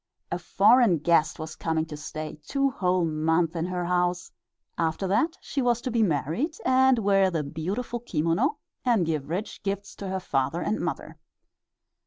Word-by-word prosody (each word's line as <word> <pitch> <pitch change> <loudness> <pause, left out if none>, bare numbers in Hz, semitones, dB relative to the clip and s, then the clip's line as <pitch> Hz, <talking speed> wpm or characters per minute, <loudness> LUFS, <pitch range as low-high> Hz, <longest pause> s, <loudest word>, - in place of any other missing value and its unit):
A - - -1
foreign 220 -2 +4
guest 160 0 +2
was 155 -1 -6
coming 160 -1 -1
to 155 - -8
stay 155 +1 -7
two 275 -1 +1
whole 180 -5 +1
months 160 +2 +1
in 165 +1 -1
her 180 -1 -2
house; 180 0 0 0.4
after 165 +3 -1
that 320 - +1
she 275 - -2
was 240 -2 +2
to 255 - -3
be 230 0 +2
married 185 - 0
and 260 0 +5
wear 195 -3 +3
her 165 -4 -1
beautiful 195 - -4
kimono, 195 - 0 0.3
and 230 -8 +3
give 155 -3 -2
rich 185 +6 -4
gifts 200 0 -4
to 200 - -6
her 190 0 -2
father 140 -1 -1
and 215 - -1
mother. - - -4
180 Hz, 170 wpm, -26 LUFS, 160-225 Hz, 0.4 s, and